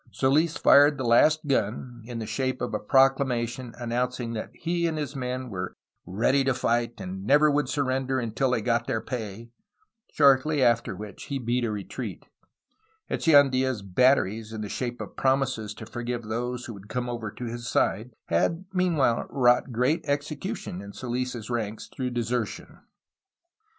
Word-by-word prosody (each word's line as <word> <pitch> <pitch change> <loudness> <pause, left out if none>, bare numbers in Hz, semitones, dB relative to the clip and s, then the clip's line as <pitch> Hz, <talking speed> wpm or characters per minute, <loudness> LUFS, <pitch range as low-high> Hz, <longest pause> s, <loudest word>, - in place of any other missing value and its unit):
Soils 150 +5 +2
fired 145 +1 +6
the 130 - -3
last 155 +7 +4
gun, 120 -2 -1
in 120 -2 -5
the 115 - -4
shape 130 +4 -2
of 125 - -3
a 105 - 0
proclamation 130 -1 +1
announcing 120 0 -2
that 110 - -4
he 170 0 -1
and 160 -1 -2
his 145 -1 -4
men 125 -1 -4
were 90 -2 -5 0.3
"ready 115 +9 +2
to 135 -1 +1
fight 120 -1 0
and 95 +1 -6
never 145 +7 +5
would 145 -2 +1
surrender 135 -2 0
until 120 +3 0
they 125 -3 +1
got 115 0 +1
their 110 - 0
pay," 115 -1 -6 0.6
shortly 140 0 +4
after 115 -3 +2
which 105 0 -9
he 140 - -3
beat 120 0 -1
a 115 - 0
retreat. 105 -2 -6 0.9
Echeandla' 135 -4 +4
s 115 -6 -4
"batteries," 110 +1 +2
in 110 -1 -5
the 105 - -5
shape 120 +1 -3
of - - -8
promises 130 -5 0
to 110 - -9
forgive 120 +1 -4
those 120 +3 -3
who 120 - -7
would 100 0 -13
come 125 -1 -2
over 120 -3 -4
to 125 - -7
his 120 +1 -5
side, 110 0 +1 0.2
had 165 - 0
meanwliile 165 -10 +2
wrought 125 0 +3
great 125 +7 +1
execution 145 - -3
in 100 0 -10
Soils' 125 -2 -4
ranks 110 -2 -3
through 130 -1 -4
desertion. 120 -2 -3
125 Hz, 165 wpm, -26 LUFS, 115-135 Hz, 0.9 s, fired